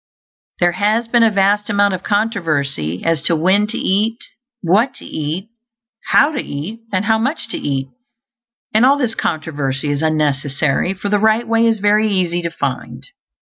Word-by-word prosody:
There 175 -1 +3
has 215 +5 0
been 235 0 +3
a 225 - +6
vast 205 0 +1
amount 200 -1 +2
of 185 - -3
controversy 155 - -1
as 165 -3 +1
to 170 - +2
when 190 +6 +2
to 215 - -5
eat, 215 +4 0 0.4
what 205 +9 +2
to - - -12
eat, 160 +7 -4 0.6
how 290 +3 +4
to 275 - -2
eat, 160 +11 -6
and 190 +1 0
how 220 0 +2
much 265 +6 -2
to - - -3
eat; 135 -1 -2 0.8
and 220 +2 +4
all 275 +3 +5
this 250 -5 -1
controversy 145 -6 -2
is 145 0 -2
unnecessary, 150 +2 0
for 200 +2 -4
the 205 0 +2
Right 220 +2 +2
Way 230 0 +3
is 225 -1 +2
very 210 +1 +2
easy 180 -3 0
to 170 - -2
find. 165 - -5
195 Hz, 175 wpm, -18 LUFS, 155-220 Hz, 0.8 s, a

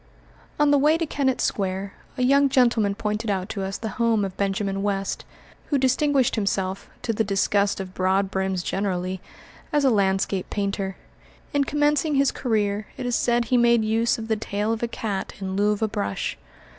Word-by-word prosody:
On 295 -1 +4
the 285 - +5
way 305 +3 +4
to 330 - -1
Kennett 270 -4 0
Square, 195 0 -1 0.2
a 255 - 0
young 275 +2 +4
gentleman 235 -6 +3
pointed 210 +2 -2
out 190 0 -1
to 200 - -4
us 195 +1 -3
the 220 - -4
home 225 -3 +3
of 190 -1 -6
Benjamin 195 0 -1
West, 195 -1 -2 0.4
who 285 - +1
distinguished 270 0 +2
himself, 195 -2 -2
to 230 - 0
the 220 - +1
disgust 200 0 +1
of 185 -1 -6
broadbrims 190 0 0
generally, 185 -1 -2 0.5
as 295 -1 +2
a 265 - +5
landscape 195 -2 +1
painter. 195 -2 -2 0.6
In 285 -1 +2
commencing 295 +1 +1
his 275 0 +3
career, 210 -3 -1
it 255 - -4
is 245 -1 0
said 240 0 +2
he 250 +2 +2
made 235 -2 +4
use 225 +2 +2
of 225 -1 -6
the 220 - +1
tail 210 +1 -2
of 225 - -4
a 235 - 0
cat 205 -4 -4
in 190 -1 -4
lieu 205 +1 +3
of 210 +1 -1
a - - +3
brush. 100 - -3
210 Hz, 185 wpm, -24 LUFS, 195-245 Hz, 0.6 s, the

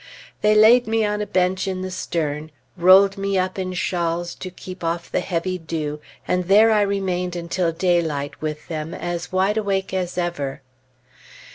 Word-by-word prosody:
They 210 0 +4
laid 230 +3 +6
me 225 0 +1
on 210 0 -1
a 210 - -3
bench 185 0 +1
in 185 -1 -3
the 185 - -4
stern, 155 -4 -3 0.3
rolled 190 +2 +6
me 195 0 0
up 185 +1 -1
in 185 -1 -3
shawls 170 -1 -1
to 185 - -7
keep 185 0 -10
off 170 +1 -3
the - - +1
heavy 185 +1 -2
dew, 155 -2 -4 0.3
and 180 0 0
there 210 +4 +6
I 215 -1 +4
remained 185 -3 -1
until 170 0 -1
daylight 165 -5 -1
with 150 -1 -4
them, 160 0 -5
as 175 -1 -4
wide 190 +3 +1
awake 195 -3 -1
as 180 -2 -2
ever. 145 -7 -3
180 Hz, 170 wpm, -22 LUFS, 170-195 Hz, 0.3 s, laid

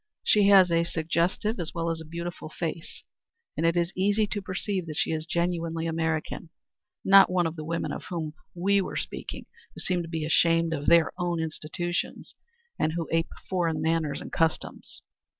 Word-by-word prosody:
She 205 -2 +4
has 190 -3 +7
a 170 0 +3
suggestive 170 +6 -1
as 170 0 -3
well 165 0 0
as 165 0 -4
a - - -9
beautiful 170 0 -6
face, 165 +1 -5 0.5
and 165 - +1
it 165 +1 +2
is 170 +1 0
easy 205 +3 +2
to 205 0 -3
perceive 190 -1 -3
that 155 -1 -6
she - - +1
is 160 0 -3
genuinely 170 -1 -1
American 160 0 -2 0.6
not 195 0 +8
one 180 -1 +2
of 165 0 -2
the 155 - -6
women 165 +2 -2
of - - -6
whom 160 -4 -4 0.2
we 195 +3 +2
were - - -4
speaking, - - -5 0.3
who - - -9
seem 180 -1 0
to 165 - -7
be 160 -2 -2
ashamed 165 +1 +3
of 145 -2 -4
their 170 -1 +5
own 175 -1 0
institutions, 160 +2 -3 0.5
and 155 - +1
who 165 -1 -2
ape 165 0 +1 0.2
foreign 170 -4 0
manners 160 -2 0
and - - -8
customs. 165 -1 -2
170 Hz, 185 wpm, -27 LUFS, 160-180 Hz, 0.6 s, not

